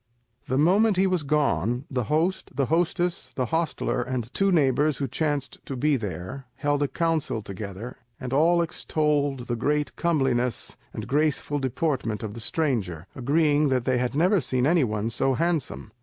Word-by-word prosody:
The 130 - 0
moment 195 +7 +4
he 190 - +4
was 185 -3 +1
gone, 140 -4 0
the 125 -3 -1
host, 165 - 0
the 135 0 +1
hostess, 175 +1 0
the 130 - 0
hostler, 160 -2 -1
and 125 -1 -4
two 195 0 +2
neighbours 150 -2 +3
who 140 - -2
chanced 145 -3 -2
to 135 - -4
be 145 +3 +2
there, 105 +3 -5
held 145 0 0
a 145 - +2
council 160 -8 -1
together, 100 +4 -7 0.2
and 130 -1 -5
all 170 +4 +4
extolled 150 -4 0
the 120 0 -3
great 145 +3 0
comeliness 130 -7 0 0.2
and - - -6
graceful 145 0 +1
deportment 130 -5 -1
of 105 -2 -4
the 115 - -8
stranger, 110 - -1
agreeing 145 +2 +2
that 130 -2 +1
they 130 -1 +2
had 125 +2 -1
never 180 +4 +3
seen 125 -1 0
any 165 +1 +4
one 110 -1 -1
so 130 +3 +1
handsome. 160 -9 -1
140 Hz, 170 wpm, -25 LUFS, 125-160 Hz, 0.2 s, moment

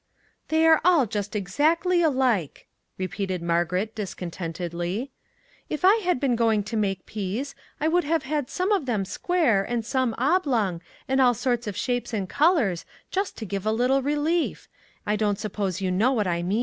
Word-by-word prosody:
" - - -40
They 320 +1 +3
are 320 -1 +6
all 335 -6 +5
just 205 -1 -4
exactly 315 - +2
alike," 255 - +1 0.3
repeated 185 -1 -3
Margaret, 175 +5 0
discontentedly. 175 - -4 0.3
" - - -34
If 305 +4 -1
I 400 +4 +7
had 360 - 0
been 260 -3 +1
go 230 -1 +2
ing 210 -2 +1
to 215 +3 -5
make 195 -4 -1
peas, 215 +7 -4 0.3
I 305 - +1
would 350 +2 +2
have 320 0 +1
had 290 -2 -2
some 370 +6 -1
of 375 -10 +1
them 210 -6 0
square, 240 - +1
and 230 +1 -2
some 255 -1 0
oblong, 245 - +1 0.3
and 265 0 +2
all 245 -2 +5
sorts 240 -1 -1
of 205 -2 -4
shapes 245 +1 -2
and 195 -3 -2
colors, 280 - +2 0.3
just 390 +1 -2
to 220 - -5
give 195 -1 -4
a 215 - +1
little 250 +4 +2
relief; 295 +4 -1 0.4
I 210 - +1
don't 205 -1 0
suppose 200 -3 -3
you 185 -1 0
know 215 +8 +3
what 215 -5 +1
I 170 -1 0
mean." 190 +6 0
230 Hz, 190 wpm, -25 LUFS, 195-295 Hz, 0.4 s, I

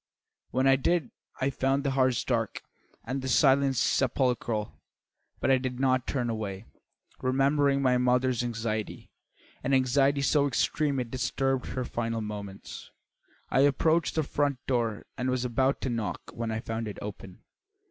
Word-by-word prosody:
When 130 +1 0
I 135 0 +6
did 155 -1 0 0.3
I 135 +1 +2
found 135 +1 0
the 140 - 0
house 130 -2 +2
dark 115 -4 -1 0.4
and 130 +3 -3
the 130 - -4
silence 135 +1 +4
sepulchral. 120 -5 0 0.6
But - - +2
I 130 - +5
did 125 -1 -4
not 130 -1 +2
turn 125 -4 -1
away. 105 -3 -4 0.6
Remembering 140 +1 +2
my 125 -1 +3
mother's 125 0 +2
anxiety, 115 -2 -4 0.5
an 135 +1 +2
anxiety 135 +2 +3
so 145 0 +3
extreme 140 +1 0
it 120 -2 -4
disturbed 135 0 -1
her 130 -1 -3
final 115 -1 -2
moments, 100 -2 -7 0.6
I - - +3
approached 155 +4 +3
the 160 - +2
front 145 -1 0
door 115 -5 -1
and 125 +1 0
was 125 -1 0
about 130 +3 +1
to 130 - -1
knock 115 -3 -4
when 115 -1 -3
I 110 0 -2
found 115 -1 -4
it 105 - -6
open. 95 -2 -9
130 Hz, 155 wpm, -28 LUFS, 115-135 Hz, 0.6 s, I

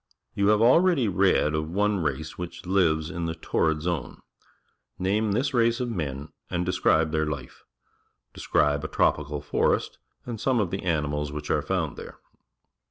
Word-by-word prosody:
You 100 0 +1
have 105 +1 +4
already 150 0 +4
read 95 -5 +2
of 75 0 -2
one 105 +3 +1
race 75 -1 -3
which 85 0 -7
lives 85 -4 +1
in 85 -2 -3
the 80 - -3
Torrid 80 -1 0
Zone. 85 -2 -3 0.8
Name 100 +3 0
this 135 +6 0
race 115 0 +2
of 125 -1 -2
men 75 -6 -4 0.2
and 90 0 -1
describe 80 -3 +2
their 80 -1 0
life. 70 -4 -6 0.7
Describe 75 0 +1
a - - -2
tropical 75 -1 0
forest 75 - 0 0.3
and 115 -3 -6
some 130 -3 +2
of 100 -5 0
the 95 - -3
animals 75 -4 -1
which 75 0 -5
are - - +2
found - - -2
tliere. - - -9
85 Hz, 165 wpm, -26 LUFS, 75-105 Hz, 0.8 s, have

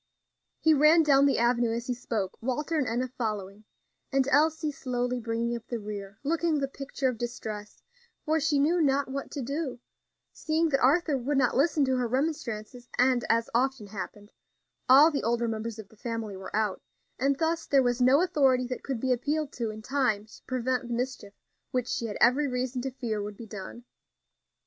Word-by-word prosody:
He 320 - +4
ran 305 +3 +6
down 280 -2 +5
the 275 - +2
avenue 235 0 +2
as 235 +1 -4
he 250 - -1
spoke, 225 -6 -3
Walter 275 +7 -2
and 290 -5 +1
Enna 245 +3 -1
following, 215 -4 -4 0.5
and 270 -1 +2
Elsie 310 +1 +2
slowly 250 -2 -2
bringing 230 +1 -2
up 235 - -8
the 240 - -3
rear, 205 -1 -7
looking 325 +1 +1
the 275 -1 0
picture 275 0 -3
of 250 -3 -2
distress, 215 -3 -6 0.4
for 315 0 +2
she 300 -1 +1
knew 325 +5 +3
not 280 -2 +2
what 275 +1 -4
to 280 - -5
do, 280 0 -3 0.5
seeing 320 +1 0
that 275 -2 +2
Arthur 285 +2 +3
would 275 +3 -1
not 255 -3 +2
listen 290 +1 +3
to 260 -1 +1
her 250 -1 0
remonstrances, 245 -3 -3
and, 250 -1 +3
as 230 0 +2
often 255 -1 +1
happened, 205 +1 -8 0.6
all 285 +5 +8
the 285 - -1
older 235 +1 0
members 225 0 -4
of 215 -3 -9
the - - -19
family 225 -3 -4
were 190 +1 -7
out, 215 -3 0 0.4
and 275 0 +2
thus 330 +1 -1
there 275 -2 +4
was 245 0 0
no 260 +5 +5
authority 270 -8 +3
that 250 0 -5
could 265 -4 -3
be 260 +1 +2
appealed 295 +4 -1
to 230 -2 -3
in 215 0 -8
time 245 -6 0
to 220 - -16
prevent 255 -1 -1
the 240 - -2
mischief 250 -4 -4 0.3
which 250 -1 -1
she 235 - -2
had 205 - -5
every 270 +5 +4
reason 250 0 -2
to 265 - -2
fear 235 -5 -3
would 205 0 -6
be 230 - -8
done. 215 +3 -8
250 Hz, 195 wpm, -28 LUFS, 230-280 Hz, 0.6 s, all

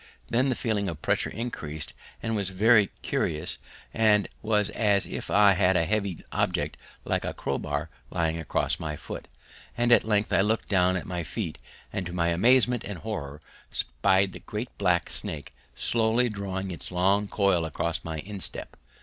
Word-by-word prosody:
Then 130 +3 +2
the 130 - +1
feeling 105 -5 -1
of 80 -3 -7
pressure - - +1
increased 80 -10 -5 0.3
and 115 0 -1
was 100 -3 -1
very 105 +2 +5 0.2
curious 80 +2 -1 0.3
and 105 -2 +4
was 105 -2 +1
as 100 -3 +3
if - - -6
I 100 0 +6
had 95 -1 +3
a 85 - +2
heavy 100 -2 -1
object - - 0 0.3
like - - 0
a - - -3
crowbar 70 +3 -2 0.2
lying 85 -2 0
across 80 - 0
my 75 -1 -3
foot, - - -8 0.5
and 120 0 +2
at 120 - +7
length 105 -1 +1
I - - +5
looked 110 +3 0
down 95 -2 +3
at - - -5
my 90 -1 -3
feet, 85 0 -4 0.3
and 95 - -1
to 90 - -7
my 85 -1 +1
amazement 120 +6 +4
and 100 -2 -5
horror 75 -8 -5 0.3
spied 95 +11 +2
the - - -8
great 110 +4 -6
black 90 -3 +2
snake 75 -2 -5 0.2
slowly 115 +1 +2
drawing 95 -2 -4
his 85 - -6
long 95 +3 +2
coil 100 -5 +2
across 80 +1 -2
my 80 -2 -4
instep! 100 0 -7
95 Hz, 170 wpm, -27 LUFS, 85-110 Hz, 0.5 s, at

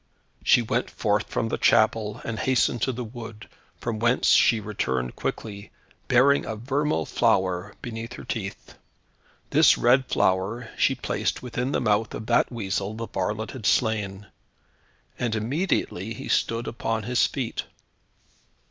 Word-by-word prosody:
She 120 - +5
went 120 +2 -1
forth 105 0 0
from 115 - -1
the - - -2
chapel, 110 0 +3
and 115 -1 -3
hastened 125 -2 +1
to 130 - +1
the 125 0 -5
wood, 115 -2 -9 0.3
from 115 -2 -3
whence 120 +2 +2
she 115 - +5
returned 65 - -2
quickly, 100 -2 -5 0.4
bearing 135 +3 +4
a 110 - -4
vermeil 140 +7 -1
flower 95 -4 +1
beneath 115 0 -6
her - - -9
teeth. 100 -4 -5 0.8
This - - +6
red 130 +2 +4
flower 100 +6 0
she 135 - +2
placed 125 - -2
within 125 +1 -2
the - - +1
mouth 105 +1 +1
of 110 - -6
that - - +2
weasel 100 -2 -2
the 115 0 -5
varlet 105 +4 -2
had 115 -6 -4
slain, 105 -3 +1 0.9
and 120 -2 0
immediately 115 - -1
he - - -7
stood 115 +1 +1
upon 115 -1 -2
his 125 +3 +2
feet. 130 -5 -4
115 Hz, 145 wpm, -25 LUFS, 105-120 Hz, 0.9 s, This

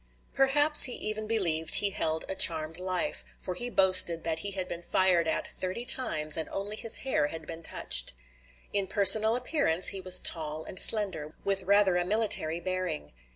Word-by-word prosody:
Perhaps 290 +3 +5
he 250 - -2
even 215 0 -5
believed 170 -8 -1
he 200 -1 +2
held 160 -3 -4
a - - -5
charmed 165 -2 +1
life, 185 -1 -5
for 180 - -7
he 240 +7 -6
boasted 185 -5 +1
that 160 -1 -4
he 200 - -5
had 185 -2 -6
been 170 - -9
fired 175 -2 0
at 160 - -3
thirty 190 +6 -7
times 155 -13 +2
and 160 - -5
only 200 +2 -7
his 225 +1 +1
hair 260 - -2
had 160 +1 -10
been 165 0 -11
touched. 60 - 0 0.6
In 200 -2 -2
personal 215 +3 +6
appearance 245 - +1
he 195 - -3
was 185 0 +7
tall 155 -1 0
and 185 - -6
slender, 190 -9 0
with 195 -1 -1
rather 200 -2 +1
a 175 - -2
military 180 -5 -1
bearing. 180 - -7
185 Hz, 180 wpm, -26 LUFS, 165-210 Hz, 0.6 s, was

